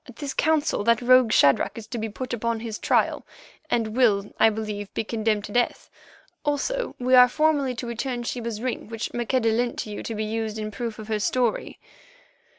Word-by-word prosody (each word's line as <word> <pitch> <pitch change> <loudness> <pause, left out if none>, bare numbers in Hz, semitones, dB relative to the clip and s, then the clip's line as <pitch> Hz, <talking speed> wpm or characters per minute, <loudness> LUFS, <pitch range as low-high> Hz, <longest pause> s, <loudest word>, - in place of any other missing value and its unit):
At 250 - -12
this 280 -1 -5
council 315 -6 +1
that 230 -1 +4
rogue 255 -2 +5
Shadrach 140 0 +3
is 225 - -7
to 240 - -4
be 220 0 -3
put 250 +4 -6
upon 230 -1 -2
his 225 -2 -5
trial, - - +1 0.5
and 225 -2 0
will, 205 -6 +2
I 225 - +6
believe, 210 -2 -5
be - - 0
condemned 215 -1 -1
to 205 - -8
death. 245 +2 -1 0.5
Also 395 - -1
we 255 +1 0
are 250 -1 +8
formally 290 -3 +1
to 235 - -5
return 240 +1 -3
Sheba's 235 -2 -4
ring 255 -4 -3
which 225 0 -5
Maqueda 240 0 +1
lent 240 +2 0
to 215 - -4
you 205 - -5
to 225 - -5
be 215 +1 -2
used 220 0 -3
in 215 0 -4
proof 230 -1 -5
of 215 - -9
her 215 -1 0
story. 240 +2 0
230 Hz, 200 wpm, -25 LUFS, 215-255 Hz, 0.5 s, are